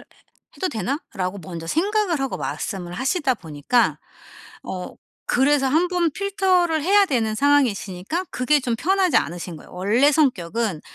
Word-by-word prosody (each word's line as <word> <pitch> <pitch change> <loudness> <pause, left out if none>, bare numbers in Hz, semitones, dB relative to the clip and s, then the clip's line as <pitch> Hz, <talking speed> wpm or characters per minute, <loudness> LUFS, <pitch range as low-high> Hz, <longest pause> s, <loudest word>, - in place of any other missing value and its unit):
해 - - -16 0.5
해도 375 - -1
되나?'라고 215 - -3
먼저 165 0 -7
생각을 370 - 0
하고 270 -1 -2
말씀을 185 -5 -4
하시다 270 - 0
보니까 165 - 0 0.7
어 180 -1 -6 0.3
그래서 275 +2 +3
1 320 +6 +2
번 350 -2 +1
필터를 370 -3 +1
해야 400 +5 +5
되는 230 - 0
상황이시니까 265 - +1
그게 275 +4 +2
좀 245 -3 -1
편하지 375 - +2
않으신 175 0 -5
거예요. - - -15
원래 215 +11 +3
성격은 225 - 0
265 Hz, 320 characters per minute, -22 LUFS, -, 0.7 s, 해야